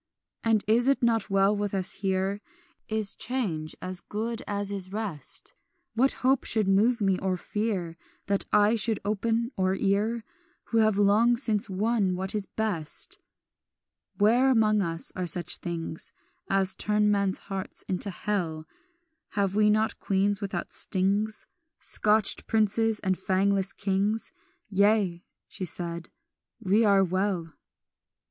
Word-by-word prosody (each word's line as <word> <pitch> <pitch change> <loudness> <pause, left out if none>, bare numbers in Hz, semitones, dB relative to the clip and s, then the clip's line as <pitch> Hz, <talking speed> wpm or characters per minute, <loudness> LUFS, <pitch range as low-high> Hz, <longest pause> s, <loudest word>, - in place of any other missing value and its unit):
"And 225 -2 +2
is 235 +4 +3
it 275 -2 +2
not 225 -3 +2
well 195 +1 +3
with 205 -1 -2
us 185 -2 -1
here? 195 +1 0 0.5
Is 215 -2 0
change 185 -12 -3
as 185 0 -3
good 225 +5 -4
as 205 0 -2
is 190 -2 -3
rest? 195 -10 -5 0.4
What 255 +5 +3
hope 265 0 +3
should 215 -3 +1
move 220 +5 +3
me, 195 -2 +2
or 190 -1 -1
fear, 190 -5 -3 0.3
That 200 0 0
eye 210 +2 +4
should 220 0 +1
open 225 +3 0
or 190 0 +1
ear, 210 +4 0 0.5
Who 230 - +2
have 215 -2 +3
long 215 +4 +4
since 220 -5 0
won 200 -1 +1
what 190 +1 -3
is 210 -2 -2
best? 190 -9 -3 1.0
"Where 235 +6 +4
among 215 -4 +3
us 165 -3 +2
are 185 -1 -2
such 175 0 -1
things 165 -2 -4 0.4
As 195 -1 +2
turn 210 0 +1
men's 200 -2 +1
hearts 195 -1 -6
into 190 +2 -2
hell? 175 -6 -3 0.7
Have 200 -2 0
we 210 0 +4
not 215 +1 +1
queens 200 +1 0
without 200 -1 -4
stings, 200 +3 +1 0.3
Scotched 215 -1 +3
princes, 220 0 +2
and 190 -2 0
fangless 195 +1 +1
kings? 200 +3 -1 0.3
Yea," 200 -3 +2 0.2
she - - -7
said, 170 -1 -3 0.5
"we 205 +4 +2
are 200 -2 +5
well. 185 -3 -1
200 Hz, 140 wpm, -27 LUFS, 190-220 Hz, 1.0 s, are